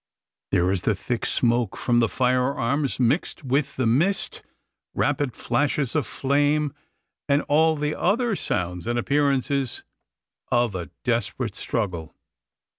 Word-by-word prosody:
There 90 +2 +2
is 95 -3 0
the 105 +2 +1
thick 120 +5 -2
smoke 120 -1 +1
from 120 -1 +2
the 115 -2 +3
firearms 130 +2 0
mixed 135 +6 0
with 135 +2 0
the 130 - 0
mist, 165 - +1 0.5
rapid 140 -4 0
flashes 145 -3 0
of 145 -8 +1
flame, 145 +1 +1 0.6
and 140 +1 +3
all 160 +2 +3
the 150 0 -1
other 225 +3 +1
sounds 90 - -3
and 120 0 0
appearances 140 -1 0 0.7
of 120 -3 +2
a 90 -2 -5
desperate - - -1
struggle. 90 -8 -3
130 Hz, 125 wpm, -24 LUFS, 115-145 Hz, 0.7 s, the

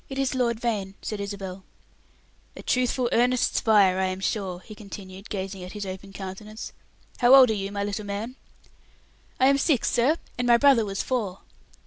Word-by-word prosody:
"It 270 - -6
is 270 -1 0
Lord 235 -3 0
Vane," 205 -5 -2
said 215 - -4
Isabel. 195 -2 -6 0.9
"A - - -10
truthful, 250 0 +1
earnest 250 +1 +2
spirit, 195 -4 +4
I - - +2
am 185 0 -3
sure," 190 -2 -2
he 215 - -11
continued, 195 -1 -10
gazing 195 -1 -5
at 180 - -8
his 210 -1 -5
open 190 +1 -7
countenance. 200 +3 -8 0.5
"How 250 +1 +7
old 255 -4 +8
are - - +2
you, 200 -1 -3
my 200 0 -2
little 205 +1 -4
man?" 210 +5 -4 1.0
"I 260 - +5
am 275 +1 +4
six, 275 -4 +2
sir; 270 +7 +3 0.2
and 245 - 0
my 240 -1 +6
brother 265 -4 +5
was 195 -1 -3
four." 210 -8 -2
210 Hz, 180 wpm, -25 LUFS, 195-245 Hz, 1.0 s, old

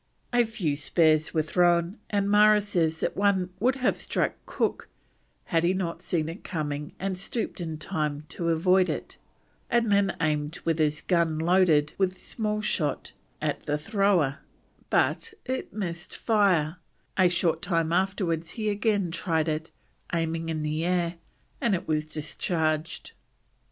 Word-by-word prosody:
A 240 -1 +4
few 200 -10 -1
spears 155 +1 +2
were 160 -2 +1
thrown, 175 +3 +2
and 200 -1 +1
Marra 210 +1 +6
says 165 -5 0
that - - -1
one 190 -2 +2
would 250 +4 +2
have 255 -2 +1
struck - - -1 0.2
Cook - - -1 0.5
had 165 -6 +1
he 180 +2 +2
not 175 -3 -3
seen 160 -3 -1
it 165 +5 -7
coming 150 -5 -4
and 195 0 -2
stooped 195 +1 -3
in 160 -2 -4
time 150 -3 -2
to 170 -1 -2
avoid 180 +3 +3
it, - - -4 0.5
and 235 -2 +2
then 200 -1 +2
aimed 150 -1 -1
with 165 -1 +1
his 150 -1 +1
gun 170 -3 +1
loaded 165 -3 +3
with 185 -1 +1
small 210 +2 -2
shot 155 -8 -1 0.3
at - - -1
the 150 - +1
thrower, 175 - +1 0.5
but - - +1
it 260 0 -3
missed 175 -4 -5
fire; 185 -8 +2 0.4
a 185 -2 +5
short 175 -1 +1
time 165 -4 0
afterwards 175 -3 0
he 215 -1 0
again 205 -3 +1
tried 165 -2 0
it, 155 0 -2 0.5
aiming 165 0 -1
in 155 -1 -2
the 155 +1 -1
air, 175 -1 0 0.4
and 225 -5 +2
it 185 +2 -5
was 155 -1 0
discharged. 155 +1 -2
170 Hz, 150 wpm, -27 LUFS, 155-195 Hz, 0.5 s, Marra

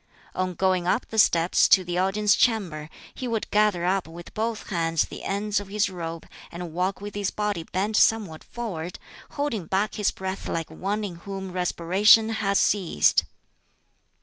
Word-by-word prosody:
On 185 -1 -2
going 185 -1 +1
up 210 +6 +1
the 220 - -1
steps 170 -4 +4
to 185 - +5
the 175 0 -2
audience 205 +2 +2
chamber, 175 -10 0 0.2
he 255 - -5
would 225 -2 -2
gather 210 -4 +2
up 185 -1 0
with 170 +1 -11
both 220 0 -3
hands 165 -2 +1
the - - -9
ends 205 +1 -1
of 205 - -8
his 205 0 0
robe, 165 -2 -6 0.2
and 170 -1 -7
walk 185 +3 -1
with 205 0 -7
his 205 -1 -1
body 210 -4 -2
bent 200 +6 -2
somewhat 200 -8 +2
forward, 180 -8 -6 0.4
holding 240 - -2
back 200 +3 0
his 210 -2 +1
breath 190 0 -5
like 165 -1 -3
one 205 +3 -3
in 185 -5 -5
whom 190 +1 -7
respiration 185 +5 +4
has 200 -3 0
ceased. 180 - +3
195 Hz, 170 wpm, -25 LUFS, 175-210 Hz, 0.4 s, to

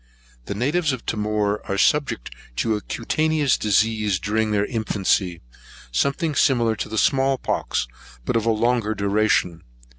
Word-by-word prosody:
The 100 - -4
natives 145 - +1
of 130 - -6
Timor 105 -1 -1
are 100 - -1
subject 140 - +1 0.2
to 110 - 0
a 105 - -4
cutaneous 155 +5 0
disease 105 -1 +1
during 110 +2 0
their 105 -1 +1
infancy, 100 -6 0 0.5
something 140 - 0
similar 120 -5 +2
to - - -4
the 110 - -4
small 135 +3 +2
pox, 60 - -2 0.4
but - - -1
of 115 0 +1
longer 115 -1 +1
duration. 100 -4 +1
110 Hz, 140 wpm, -22 LUFS, 105-130 Hz, 0.5 s, similar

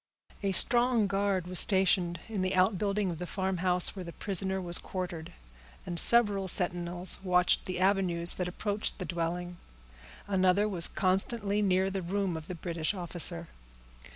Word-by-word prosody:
A 200 -2 -1
strong 240 0 +3
guard 195 -2 -2
was 180 0 +2
stationed 185 -3 +2
in 215 -4 -4
the 185 0 -1
outbuilding 195 +1 0
of 165 - -8
the 180 - -6
farmhouse 185 -1 0
where 190 - -7
the 170 - -9
prisoner 190 +1 -3
was 175 -2 0
quartered, 175 -3 -7 0.5
and 175 -1 +2
several 205 -4 +5
sentinels 175 -1 0
watched 180 -1 +1
the 185 -1 -4
avenues 185 -3 +2
that 180 - -4
approached 205 +3 -4
the 185 - -6
dwelling. 175 +1 -5 0.7
Another 190 +1 +1
was 180 -5 +5
constantly 200 +2 -1
near 190 -1 0
the 190 0 -4
room 190 0 -3
of 160 0 -8
the 180 - -7
British 170 +2 -3
officer. 175 -1 +1
185 Hz, 155 wpm, -28 LUFS, 175-195 Hz, 0.7 s, several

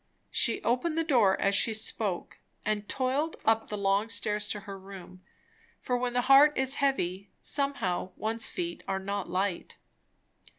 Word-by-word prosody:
She 230 - +2
opened 255 +8 0
the 330 - +2
door 235 - +3
as 195 - +2
she 220 +2 +3
spoke, 215 -4 -2 0.3
and 210 -1 -2
toiled 275 +5 -1
up 225 0 +2
the 210 - -3
long 200 +2 +1
stairs 210 -1 -1
to 210 - -3
her 200 0 -8
room; 190 -1 -11 0.6
for 250 - -1
when 245 0 -1
the 245 - +2
heart 275 +3 +6
is 265 +1 +1
heavy 200 -9 0
somehow 275 -12 -1
one's 225 +1 0
feet 175 -1 -4
are 195 -1 -1
not 195 -1 -4
light. 185 0 -2
215 Hz, 160 wpm, -29 LUFS, 195-255 Hz, 0.6 s, heart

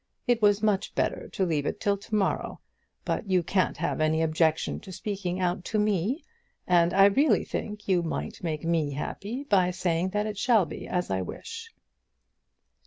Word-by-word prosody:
It 240 -2 +2
was 205 0 +4
much 210 -1 +1
better - - -1
to 190 - -1
leave 150 -4 0
it - - -3
till 200 -1 +1
to 200 +2 -5
morrow. 200 -3 0 0.5
But 210 - -2
you 185 -2 +3
can't 185 +2 +1
have - - -1
any 160 +1 +2
objection 160 0 +1
to 190 - -11
speaking 185 -1 -3
out 180 0 0
to 220 - -1
me, 210 - 0 0.4
and 175 -1 +4
I 195 +1 +6
really 275 +10 +4
think 210 0 -5
you 185 -3 +3
might 165 - -4
make 160 -3 -3
me 160 -4 +1
happy 205 - -4
by 195 -9 +3
saying 180 0 0
that 210 +2 -1
it 210 -2 -4
shall 225 -4 +4
be 155 - -8
as 180 - -2
I 95 0 0
wish." 455 - -7
190 Hz, 180 wpm, -27 LUFS, 170-210 Hz, 0.5 s, I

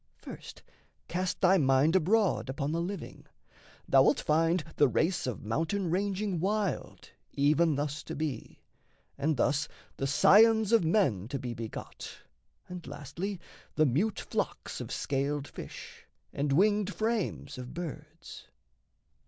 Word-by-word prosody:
First, - - -11 0.4
cast 185 +1 -2
thy 190 0 +5
mind 135 +4 +3
abroad 190 -3 +2
upon 140 +2 -2
the 165 +1 -1
living: 195 +3 -6 0.6
Thou'lt - - +5
find 165 +2 +2
the 145 - +6
race 165 +6 0
of 125 - -4
mountain 165 - -1
ranging 195 0 -1
wild 200 -2 -2 0.2
Even 150 +3 +3
thus 145 +1 -2
to - - -6
be, 145 -6 -5 0.5
and 145 +1 0
thus 145 +4 +1 0.3
the 135 - -1
scions 220 +8 +5
of 230 -5 +5
men 150 - +1
To 140 +3 -3
be 125 -2 -5
begot, 115 -1 -8 0.5
and 180 -2 -8
lastly 165 +8 -5 0.4
the 155 - +4
mute 170 - +1
flocks - - -4
Of - - -7
scaled 140 +1 -2
fish, - - -10 0.3
and 140 0 -1
winged 205 +5 +3
frames 215 - -2
of 125 0 -8
birds. 170 -4 -8
160 Hz, 130 wpm, -30 LUFS, 140-195 Hz, 0.6 s, the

